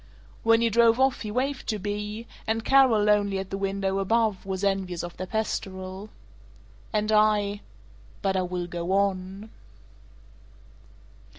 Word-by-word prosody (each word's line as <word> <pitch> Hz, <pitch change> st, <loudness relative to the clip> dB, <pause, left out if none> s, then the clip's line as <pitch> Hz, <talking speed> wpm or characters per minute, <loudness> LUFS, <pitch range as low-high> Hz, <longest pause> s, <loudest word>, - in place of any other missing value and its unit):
When 230 Hz, 0 st, +4 dB
he 230 Hz, -1 st, +2 dB
drove 230 Hz, +2 st, +4 dB
off 265 Hz, -1 st, +2 dB
he 215 Hz, -, -4 dB
waved 260 Hz, +4 st, -2 dB
to 215 Hz, -, 0 dB
Bea; 210 Hz, +2 st, -4 dB, 0.2 s
and 220 Hz, 0 st, -1 dB
Carol, 260 Hz, -6 st, +5 dB
lonely 205 Hz, -2 st, +2 dB
at 190 Hz, 0 st, -5 dB
the -, -, -2 dB
window 195 Hz, 0 st, -1 dB
above, 215 Hz, -1 st, 0 dB
was 190 Hz, 0 st, -3 dB
envious 190 Hz, -3 st, -1 dB
of 175 Hz, 0 st, -7 dB
their 185 Hz, -, -6 dB
pastoral. 190 Hz, -2 st, -4 dB, 0.8 s
"And 215 Hz, 0 st, 0 dB
I 210 Hz, -1 st, +3 dB, 0.6 s
But 195 Hz, -1 st, +1 dB
I 185 Hz, -, +2 dB
will 180 Hz, -1 st, -3 dB
go 175 Hz, +1 st, -3 dB
on." 195 Hz, +1 st, -1 dB
205 Hz, 140 wpm, -26 LUFS, 190-220 Hz, 0.8 s, Carol